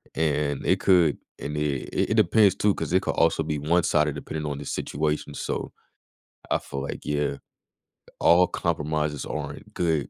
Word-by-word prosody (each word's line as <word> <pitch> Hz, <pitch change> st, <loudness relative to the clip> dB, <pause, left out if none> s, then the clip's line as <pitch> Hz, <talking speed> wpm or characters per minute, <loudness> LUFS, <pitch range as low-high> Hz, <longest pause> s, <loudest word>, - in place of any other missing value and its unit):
and 75 Hz, -3 st, 0 dB
it -, -, +3 dB
could 90 Hz, -6 st, +4 dB, 0.2 s
and 75 Hz, +1 st, -4 dB
it 75 Hz, -3 st, -2 dB, 0.2 s
it -, -, +2 dB
depends 105 Hz, 0 st, +5 dB
too, 105 Hz, -1 st, +2 dB
'cause 90 Hz, -, -4 dB
it 95 Hz, -, +4 dB
could -, -, -1 dB
also 80 Hz, -1 st, +2 dB
be 75 Hz, -1 st, -2 dB
one-sided 75 Hz, -1 st, +2 dB
depending 80 Hz, -1 st, -5 dB
on 75 Hz, -2 st, -3 dB
the 75 Hz, -, -7 dB
situation, 75 Hz, +2 st, -2 dB
so, -, -, -4 dB, 0.8 s
I -, -, +3 dB
feel 70 Hz, -, -6 dB
like, 70 Hz, -, -5 dB
yeah, 75 Hz, -1 st, 0 dB, 0.8 s
all 90 Hz, +1 st, +5 dB
compromises 75 Hz, -3 st, -2 dB
aren't 70 Hz, -2 st, -6 dB
good 80 Hz, -5 st, 0 dB
75 Hz, 160 wpm, -25 LUFS, 75-85 Hz, 0.8 s, depends